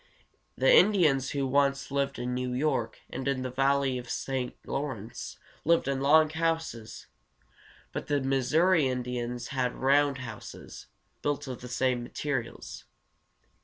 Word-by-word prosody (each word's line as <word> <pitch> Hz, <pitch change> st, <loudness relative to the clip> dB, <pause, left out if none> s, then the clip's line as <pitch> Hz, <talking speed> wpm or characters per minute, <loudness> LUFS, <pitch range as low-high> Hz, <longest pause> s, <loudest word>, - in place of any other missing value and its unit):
The -, -, +5 dB
Indians 160 Hz, -, +4 dB
who 140 Hz, -1 st, -1 dB
once 140 Hz, +1 st, +1 dB
lived 140 Hz, 0 st, 0 dB
in 125 Hz, +1 st, -3 dB
New 125 Hz, 0 st, -2 dB
York 130 Hz, -4 st, -1 dB
and 130 Hz, +1 st, -4 dB
in 135 Hz, -2 st, 0 dB
the 130 Hz, -, -3 dB
valley 135 Hz, 0 st, +2 dB
of 120 Hz, -, -8 dB
the -, -, -14 dB
St. 130 Hz, -2 st, -3 dB
Law´rence 125 Hz, -6 st, -5 dB, 0.3 s
lived 165 Hz, -3 st, +3 dB
in 135 Hz, -1 st, 0 dB
long 155 Hz, +2 st, +5 dB
houses, 160 Hz, -9 st, -2 dB, 0.9 s
but -, -, -5 dB
the 145 Hz, -1 st, +2 dB
Mis 135 Hz, -1 st, 0 dB
sou´ri 165 Hz, -1 st, +4 dB
Indians 125 Hz, -1 st, -3 dB
had 130 Hz, -2 st, -1 dB
round 140 Hz, +1 st, +3 dB
houses, 115 Hz, -5 st, -9 dB, 0.3 s
built 145 Hz, 0 st, -1 dB
of 130 Hz, -2 st, -6 dB
the 125 Hz, -, -7 dB
same 125 Hz, 0 st, +1 dB
materials. 125 Hz, -1 st, -4 dB
135 Hz, 145 wpm, -29 LUFS, 125-145 Hz, 0.9 s, The